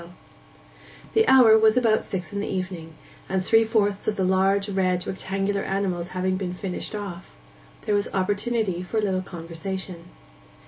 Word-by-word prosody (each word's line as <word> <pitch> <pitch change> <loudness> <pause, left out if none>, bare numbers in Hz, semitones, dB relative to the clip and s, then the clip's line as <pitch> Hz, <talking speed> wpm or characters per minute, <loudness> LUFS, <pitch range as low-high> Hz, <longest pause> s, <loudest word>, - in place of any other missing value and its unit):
The 445 0 +3
hour 250 -4 +7
was 220 +1 +4
about 225 -3 +3
six 180 -1 -5
in 200 - -2
the 205 - -3
evening, 180 -4 -5 0.3
and 190 -1 -1
three 225 +2 +5
fourths 205 -3 0
of 215 - +1
the 190 - -1
large, 190 +2 +2
red, 185 -2 0
rectangular 195 +1 -2
animals 190 -3 -2
having 185 0 0
been 180 -2 -4
finished 190 +2 -5
off, 195 -4 -7 0.5
there 210 - 0
was 205 0 +1
opportunity 205 0 0
for 185 +5 -4
a - - +3
little 190 -3 0
conversation. 175 +1 -6
195 Hz, 155 wpm, -24 LUFS, 185-205 Hz, 0.5 s, hour